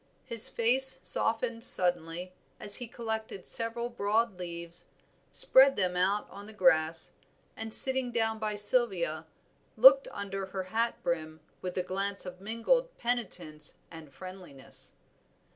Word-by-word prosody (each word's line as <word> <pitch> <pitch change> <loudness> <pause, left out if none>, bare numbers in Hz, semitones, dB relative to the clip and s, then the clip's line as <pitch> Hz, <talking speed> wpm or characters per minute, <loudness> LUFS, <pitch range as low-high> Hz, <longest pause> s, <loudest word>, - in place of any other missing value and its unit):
His 230 -2 +5
face 260 +3 +4
softened 230 0 +2
suddenly 175 -1 +1 0.3
as 205 -1 +2
he 245 - -8
collected 220 -4 -7
several 235 +1 -1
broad 215 -2 -2
leaves, 170 -1 -3 0.4
spread 270 +1 +3
them 180 -2 -2
on 200 +2 -3
the 220 - -12
grass, 165 -4 +3 0.4
and 225 0 -8
sitting 260 +1 +4
down 225 -1 -2
by 215 -1 -4
Sylvia, 195 -8 +3 0.5
looked 270 +4 +6
under 195 -1 -7
her 190 0 -6
hat 225 +5 -4
brim 160 -2 -5 0.2
with 180 0 -7
a 180 - -1
glance 195 +2 -5
of 180 0 -11
mingled - - -2
penitence 190 -11 -5
and 160 -3 -13
friendliness. 170 -2 -9
200 Hz, 125 wpm, -28 LUFS, 180-230 Hz, 0.5 s, looked